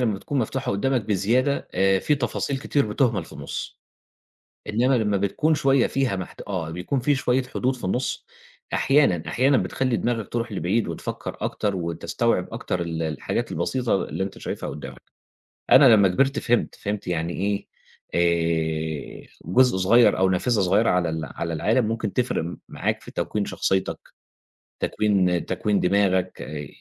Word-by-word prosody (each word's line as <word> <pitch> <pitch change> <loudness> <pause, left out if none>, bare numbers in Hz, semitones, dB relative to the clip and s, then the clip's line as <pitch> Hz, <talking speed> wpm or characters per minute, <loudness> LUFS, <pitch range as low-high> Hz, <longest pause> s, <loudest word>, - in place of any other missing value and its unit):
لمّا 115 -4 +1
بتكون 135 +8 -3
مفتوحة 130 +2 -1
قدّامك 125 +6 +1
بزيادة 115 +8 +1
آآ، 95 0 +3
في 150 - +1
تفاصيل 135 +1 -2
كتير 140 -1 0
بتُهْمل 105 - +1
في - - -15
النُص، 70 - -6 0.9
إنّما 120 +5 +2
لمّا 105 -2 +1
بتكون 100 +11 +1
شوية 135 -3 +3
فيها 135 -7 0
محت 95 -1 -7
آه 90 -6 -3
بيكون 90 +11 -2
في 145 +4 +2
شوية 130 -1 +1
حدود 130 0 -2
في 125 - -9
النُص، 125 +8 -2 0.5
أحيانًا، 135 - +3
أحيانًا 135 +3 +3
بتخلّي 130 -1 0
دماغك 115 -4 -1
ترُوح 115 -1 -3
لبعيد 100 +5 0
وتفكّر - - -5
أكتر، 100 -2 -1
وتستوعب 85 -2 -1
أكتر 90 - -3
ال 85 -1 -3
الحاجات 80 -3 -2
البسيطة 125 -3 0
اللي 85 +7 -3
أنت 95 - -7
شايفها - - -5
قُدّامك، 75 - -8 0.7
أنا 130 -4 +8
لمّا 100 -2 +5
كبِرت 135 +10 +1
فهمت، 120 -2 0
فهمت 105 -1 -4
يعني 85 -1 -1
إيه، 100 +1 -2 0.5
آآ، 80 -3 -1 0.2
جزء 125 +5 +4
صغير 115 +6 +5
أو 95 0 +3
نافذة 105 +4 +1
صغيرة 100 +5 +3
على 90 -2 +2
ال 80 0 -3
على 85 +5 -5
العالم 110 - +2
ممكن 110 -3 -2
تفرق 90 -9 -1
معاك - - -2
في - - -11
تكوين 105 -1 -2
شخصيتك، 95 -1 -1 0.8
تكوين 95 -5 +1
تكوين 100 +2 0
دماغك 95 -1 +1
آآ، 75 -1 -6
100 Hz, 155 wpm, -24 LUFS, 90-125 Hz, 0.9 s, أنا